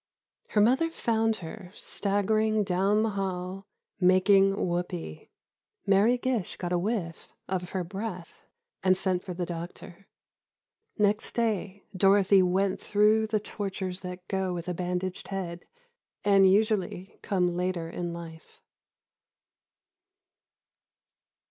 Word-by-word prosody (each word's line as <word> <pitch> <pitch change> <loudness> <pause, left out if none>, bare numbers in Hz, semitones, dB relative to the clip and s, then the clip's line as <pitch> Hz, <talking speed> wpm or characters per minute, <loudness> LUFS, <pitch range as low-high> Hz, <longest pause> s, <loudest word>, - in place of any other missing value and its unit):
Her 210 - +2
mother 265 +10 +3
found 225 -7 0
her, 180 +2 -9
staggering 215 +2 0
down 195 +3 +2
the 225 - 0
hall, 190 -1 -4 0.3
"making 195 +1 +5
whoopee." 175 - -4 0.6
Mary 205 +5 +4
Gish 245 -6 -2
got 180 -1 -3
a 175 - +2
whiff 185 -4 -3
of 180 -2 -3
her 185 -2 -2
breath, 185 -1 -6 0.4
and 185 -1 +4
sent 185 -2 -1
for 180 -3 -6
the 175 0 -2
doctor. 175 +2 -8 0.9
Next 210 0 +1
day 205 -4 -1
Dorothy 195 0 +5
went 190 +1 +1
through 215 +1 +3
the 215 0 +1
tortures 195 -3 -4
that 180 -1 -8
go 190 -2 -1
with 170 0 -6
a 180 - -1
bandaged 180 +1 -3
head, 180 -3 -5 0.6
and 195 -2 +6
usually 205 -2 0
come 180 -4 0
later 180 -2 -1
in 175 +1 -4
life. 165 -1 -10
190 Hz, 115 wpm, -28 LUFS, 180-205 Hz, 0.9 s, and